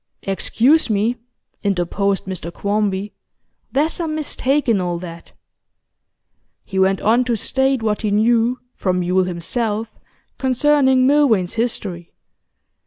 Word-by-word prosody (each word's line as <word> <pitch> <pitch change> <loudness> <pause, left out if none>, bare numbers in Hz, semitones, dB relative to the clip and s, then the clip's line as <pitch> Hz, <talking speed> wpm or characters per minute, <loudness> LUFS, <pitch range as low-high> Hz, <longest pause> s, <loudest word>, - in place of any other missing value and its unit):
'Excuse 240 +9 +2
me,' 215 +3 +1 0.5
interposed 200 +1 0
Mr 185 -3 -6
Quarmby, 205 0 -1 0.6
'there's 300 +4 +1
some 320 -3 -3
mistake 290 -2 0
in 220 -5 +2
all 175 -1 -2
that.' 170 -1 -10 1.3
He 190 - -3
went 190 0 +2
on 235 +4 +3
to 240 -1 0
state 265 +2 0
what 210 -1 0
he 215 - -1
knew, 230 +4 +2 0.2
from 180 -1 -1
Yule 180 +1 +2
himself, 215 +5 -2 0.5
concerning 265 0 +3
Milvain's 260 -11 +3
history. 200 -7 -3
215 Hz, 115 wpm, -19 LUFS, 190-255 Hz, 1.3 s, on